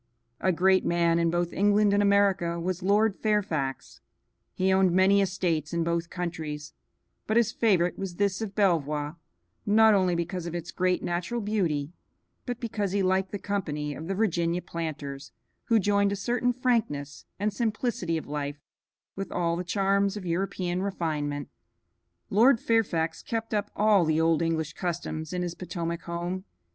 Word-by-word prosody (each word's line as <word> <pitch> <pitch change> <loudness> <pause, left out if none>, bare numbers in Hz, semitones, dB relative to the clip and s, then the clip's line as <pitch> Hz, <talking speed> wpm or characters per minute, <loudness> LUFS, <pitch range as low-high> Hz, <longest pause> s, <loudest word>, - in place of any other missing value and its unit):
A 190 - +2
great 185 +2 +3
man 170 -1 +2
in 170 0 +2
both 175 0 -1
England 205 +1 +3
and 205 - +3
America 200 -4 +2
was 180 +2 -2
Lord 205 +2 +3
Fairfax; 180 -11 -2 0.5
he 190 +1 +2
owned 190 -1 +4
many 190 +2 +5
estates 175 -5 -1
in 170 -1 +1
both 170 0 -1
countries, 155 -4 -5 0.5
but 220 - +2
his 230 -2 +3
favorite 185 -7 +2
was 190 -3 -4
this 200 +1 0
of 205 -3 -5
Belvoir, 155 -6 +1 0.5
not 220 +1 +5
only 185 -3 +2
because 175 +1 -3
of 170 - -5
its 175 0 -5
great 185 0 0
natural 175 +7 -2
beauty, 175 -9 -1 0.6
but 245 -1 -3
because 210 -4 -2
he 200 -1 +1
liked 190 +1 +1
the 205 - -3
company 155 -7 -3
of 160 +3 -7
the 195 - -1
Virginia 175 -4 0
planters, 150 -5 -6 0.3
who 230 - +3
joined 200 0 +2
a - - 0
certain 245 +5 0
frankness 230 - -1
and 205 +1 0
simplicity 215 -6 -1
of 160 - -6
life 145 0 -4 0.6
with 195 0 -5
all 170 -1 0
the 175 - -3
charms 195 +2 +1
of 195 - -7
European 180 0 -1
refinement. 150 -7 -2 0.8
Lord 230 +4 +5
Fairfax 180 -10 0
kept 225 -1 -4
up 210 0 0
all 210 -3 +4
the 160 -1 +1
old 165 0 +3
English 160 -2 -1
customs 165 -3 -4
in 180 -1 -2
his 175 -1 -3
Potomac 170 -2 -4
home. 175 +2 -4
180 Hz, 160 wpm, -27 LUFS, 165-200 Hz, 0.8 s, many